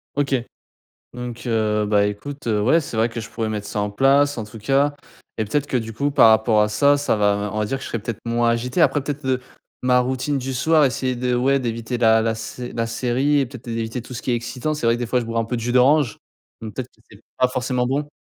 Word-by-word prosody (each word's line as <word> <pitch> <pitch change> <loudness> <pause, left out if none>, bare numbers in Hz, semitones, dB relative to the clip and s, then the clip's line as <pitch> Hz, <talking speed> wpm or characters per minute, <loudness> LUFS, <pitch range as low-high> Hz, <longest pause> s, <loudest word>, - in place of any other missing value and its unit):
OK 140 -1 +1 0.8
donc 125 -1 -7
heu, 105 -2 +1
bah, 105 -1 +3
écoute, 130 +7 -6
heu, 105 -2 +1
ouais, 155 +9 +4
c'est 130 -7 -7
vrai 115 +2 +2
que 115 0 -6
je 110 - -8
pourrais 115 -1 -3
mettre 105 -1 -4
ça 105 - -3
en 105 0 -1
place, 140 +5 +3
en 110 - -3
tout 110 +2 -11
cas 140 +5 +2 0.4
et 110 - +1
peut-être 140 +7 -1
que 135 - -1
du 115 -2 -3
coup, 140 +5 0
par 125 -6 +7
rapport 110 0 +4
à 105 - +1
ça, 140 +7 +3
ça 145 - +1
va 105 -1 +2
me 105 0 -3
on 110 - -1
va 105 - +1
dire, 135 +6 -2
que - - -12
je - - -6
serai 115 - -2
peut-être 110 +1 -6
moins 120 0 +1
agité. 125 +7 -1
Après, 145 - +3
peut-être, 145 0 -5
heu, 130 -1 +1 0.4
ma 125 0 +4
routine 130 +3 -1
du 135 0 -4
soir, 155 +4 +3
essayer 130 -1 0
de 125 0 0
ouais, 135 +3 +2
d'éviter 115 -1 -3
la 110 -1 +5
la 115 0 0
sé 115 +2 -7
la 115 0 -1
série 130 +5 +1
et 135 - 0
peut-être, 125 -1 -12
é 115 - -3
éviter 115 +2 -3
tout 125 - -11
ce 115 - -5
qui - - -2
est 120 - +2
excitant. 125 +6 -3
C'est 150 - -5
vrai 115 - +4
que - - -3
des 120 - -1
fois, 125 +2 +1
je - - -4
bois 115 0 -3
un 115 - -1
peu 120 - -2
de - - -4
jus 120 +1 -1
d'orange, 130 -1 +3 0.4
donc 110 -2 -7
peut-être 130 -2 -5
que - - -29
c'est 105 +1 -16 0.2
pas 125 - +4
forcément 125 -1 -1
bon. 145 +2 -2
120 Hz, 275 wpm, -22 LUFS, 110-135 Hz, 0.8 s, par